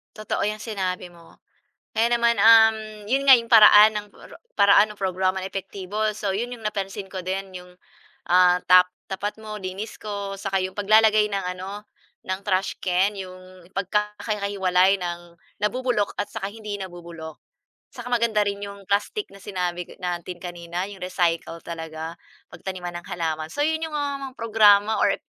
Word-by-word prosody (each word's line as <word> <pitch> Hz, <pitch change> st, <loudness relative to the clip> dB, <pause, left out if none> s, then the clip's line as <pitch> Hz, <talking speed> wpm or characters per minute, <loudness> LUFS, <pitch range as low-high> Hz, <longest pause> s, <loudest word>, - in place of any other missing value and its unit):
Totoo 215 Hz, -1 st, -3 dB
'yang 215 Hz, +1 st, -3 dB
sinabi 185 Hz, -5 st, -4 dB
mo, 170 Hz, -1 st, -19 dB, 0.5 s
kaya 230 Hz, +2 st, +2 dB
naman, 235 Hz, 0 st, +3 dB
um, 220 Hz, -2 st, +5 dB
'yon 270 Hz, +4 st, +1 dB
nga 265 Hz, -, +11 dB
'yong 230 Hz, 0 st, -7 dB
paraan, 215 Hz, -1 st, +9 dB
ng 210 Hz, 0 st, -4 dB
para -, -, -15 dB, 0.2 s
paraan 200 Hz, +1 st, +6 dB
ng 205 Hz, -, -23 dB
programa 190 Hz, 0 st, 0 dB
na 185 Hz, -, -4 dB
epektibo. 195 Hz, +1 st, -5 dB
So, 205 Hz, -2 st, -2 dB
'yon 235 Hz, +5 st, -3 dB
'yong 230 Hz, -3 st, -11 dB
napansin 200 Hz, -1 st, -4 dB
ko 190 Hz, -, -5 dB
din, 190 Hz, +1 st, -4 dB
'yong, 180 Hz, 0 st, -10 dB, 0.6 s
ah, 180 Hz, 0 st, +5 dB
tap 180 Hz, 0 st, +7 dB, 0.2 s
tapat 205 Hz, +3 st, -4 dB
mo 215 Hz, -2 st, -8 dB
linis 190 Hz, +4 st, -6 dB
ko, 200 Hz, -2 st, -5 dB
saka 195 Hz, 0 st, -2 dB
'yong 185 Hz, 0 st, -3 dB
paglalagay 215 Hz, +1 st, +4 dB
ng 195 Hz, -2 st, -2 dB
ano, 195 Hz, +3 st, -8 dB, 0.4 s
ng 185 Hz, 0 st, -3 dB
trash 190 Hz, -1 st, 0 dB
can, 185 Hz, +3 st, +1 dB
'yong 185 Hz, -1 st, -11 dB
pagkakahiwalay 200 Hz, -1 st, 0 dB
ng 175 Hz, -1 st, -7 dB, 0.2 s
nabubulok 240 Hz, -1 st, 0 dB
at 205 Hz, -, -1 dB
saka 200 Hz, -3 st, -4 dB
hindi 210 Hz, -1 st, -7 dB
nabubulok. 170 Hz, -4 st, -9 dB, 0.5 s
Saka 245 Hz, -2 st, -9 dB
maganda 235 Hz, -3 st, +2 dB
rin 200 Hz, 0 st, -3 dB
'yong 200 Hz, -1 st, -9 dB
plastic 205 Hz, -, -1 dB
na 200 Hz, -, -14 dB
sinabi 180 Hz, -3 st, -3 dB
k -, -, -15 dB
natin 175 Hz, 0 st, -4 dB
kanina, 175 Hz, +1 st, -5 dB
'yong 195 Hz, -2 st, -9 dB
recycle 170 Hz, -2 st, -1 dB
talaga, 160 Hz, 0 st, -7 dB, 0.3 s
pagtaniman 180 Hz, -2 st, -7 dB
ng -, -, -21 dB
halaman. 160 Hz, -2 st, -3 dB
So 290 Hz, -, -2 dB
'yon 315 Hz, +1 st, 0 dB
'yong, 315 Hz, -, -8 dB
ah, 285 Hz, -1 st, -2 dB
mga 260 Hz, -, -21 dB
programa 215 Hz, -1 st, +4 dB
or -, -, +3 dB
195 Hz, 165 wpm, -24 LUFS, 180-215 Hz, 0.6 s, nga